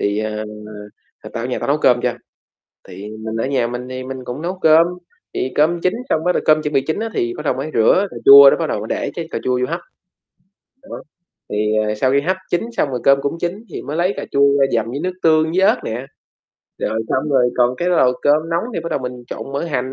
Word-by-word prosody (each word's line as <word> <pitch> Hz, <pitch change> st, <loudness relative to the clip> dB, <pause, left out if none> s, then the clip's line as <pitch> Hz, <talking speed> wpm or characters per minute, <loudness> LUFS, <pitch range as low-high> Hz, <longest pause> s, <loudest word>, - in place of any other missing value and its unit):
thì 100 Hz, +1 st, 0 dB
ờ, 110 Hz, 0 st, -3 dB, 0.9 s
tao -, -, -4 dB
ở -, -, -1 dB
nhà -, -, -3 dB
tao -, -, -4 dB
nấu -, -, +2 dB
cơm -, -, +3 dB
cho, -, -, 0 dB, 0.8 s
thì 95 Hz, +3 st, -9 dB, 0.2 s
mình 110 Hz, 0 st, -4 dB
ở 115 Hz, -, -1 dB
nhà 130 Hz, -3 st, 0 dB
mình 125 Hz, +1 st, -6 dB
thì 130 Hz, 0 st, -6 dB
mình 130 Hz, 0 st, -7 dB
cũng 125 Hz, +5 st, -6 dB
nấu 180 Hz, +2 st, -4 dB
cơm, 160 Hz, +1 st, +6 dB, 0.5 s
thì 130 Hz, -, -2 dB
cơm 165 Hz, +3 st, +2 dB
chín 180 Hz, +1 st, 0 dB
xong 160 Hz, -, 0 dB
bắt 180 Hz, -, +3 dB
đầu -, -, -1 dB
cơm 155 Hz, 0 st, +4 dB
chuẩn 150 Hz, -, -3 dB
bị 135 Hz, -, +4 dB
chín 160 Hz, -, -1 dB
á, 225 Hz, -, -2 dB
thì 120 Hz, 0 st, -1 dB
bắt -, -, -6 dB
đầu 140 Hz, -, +1 dB
mới 135 Hz, +4 st, -5 dB
rửa 150 Hz, -, +4 dB
cà -, -, -11 dB
chua 140 Hz, 0 st, +10 dB
đó -, -, +1 dB
bắt 165 Hz, -, -2 dB
đầu -, -, -2 dB
mới 105 Hz, -, -6 dB
để -, -, -2 dB
cái 165 Hz, -1 st, -5 dB
cà -, -, -3 dB
chua 125 Hz, -1 st, +1 dB
vô 125 Hz, -, +1 dB
hấp. 170 Hz, +3 st, -3 dB, 1.0 s
Đó, 280 Hz, -, -9 dB, 0.5 s
thì 105 Hz, +1 st, 0 dB
ờ, 105 Hz, -, -1 dB
sau 130 Hz, +5 st, +1 dB
khi 140 Hz, -, +3 dB
hấp 185 Hz, +6 st, -1 dB
chín 175 Hz, -, +1 dB
xong -, -, +1 dB
rồi 125 Hz, -2 st, -3 dB
cơm 140 Hz, 0 st, +5 dB
cũng 145 Hz, +4 st, -2 dB
chín 185 Hz, +6 st, -4 dB
thì -, -, -5 dB
mới 150 Hz, -, -5 dB
lấy 175 Hz, +3 st, +1 dB
cà -, -, -4 dB
chua 140 Hz, 0 st, +4 dB
ra 135 Hz, -, +5 dB
dầm 115 Hz, -2 st, +1 dB
với 140 Hz, +4 st, -4 dB
nước 185 Hz, -, -1 dB
tương 160 Hz, -1 st, +3 dB
với 185 Hz, -, +3 dB
ớt -, -, +4 dB
nè. 120 Hz, +4 st, -4 dB, 0.7 s
Rồi, 110 Hz, 0 st, -2 dB
xong 145 Hz, +3 st, -1 dB
rồi 125 Hz, -3 st, +3 dB
còn 125 Hz, 0 st, +3 dB
cái 175 Hz, -, -1 dB
nồi 130 Hz, -8 st, +3 dB
cơm 155 Hz, +3 st, +2 dB
nóng 170 Hz, +4 st, 0 dB
thì -, -, -2 dB
bắt 170 Hz, -, -6 dB
đầu -, -, 0 dB
mình 125 Hz, -1 st, -7 dB
trộn 135 Hz, -, -7 dB
mỡ 140 Hz, +4 st, -2 dB
hành, 130 Hz, -5 st, -3 dB
140 Hz, 260 wpm, -19 LUFS, 125-165 Hz, 1.0 s, chua